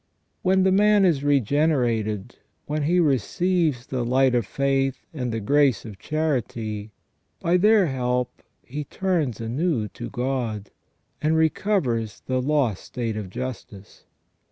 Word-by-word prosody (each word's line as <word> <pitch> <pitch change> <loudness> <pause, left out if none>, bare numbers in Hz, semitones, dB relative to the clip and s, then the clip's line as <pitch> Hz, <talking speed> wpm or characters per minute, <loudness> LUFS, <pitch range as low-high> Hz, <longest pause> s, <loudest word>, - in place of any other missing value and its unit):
When 190 0 +3
the 190 - +4
man 205 +1 +5
is 155 -6 +2
regenerated, 125 -6 +1 0.3
when 150 +1 -2
he 175 +4 +3
receives 155 - +1
the 125 -2 -2
light 130 +2 +3
of 120 -5 +1
faith 135 0 0
and 125 -5 -3
the 115 - -2
grace 140 +3 +2
of 105 -4 -9
charity, 115 -9 -2 0.5
by 170 +1 +2
their 210 +1 +5
help 125 -3 -2 0.2
he 145 +4 -5
turns 160 - -1
anew 120 0 -1
to 120 +5 -7
God, 120 -5 -3 0.5
and 155 +1 +2
recovers 155 - 0
the 130 0 0
lost 135 -7 0
state 115 -3 -4
of 105 -3 -5
justice. 105 -2 -8
130 Hz, 130 wpm, -24 LUFS, 115-155 Hz, 0.5 s, man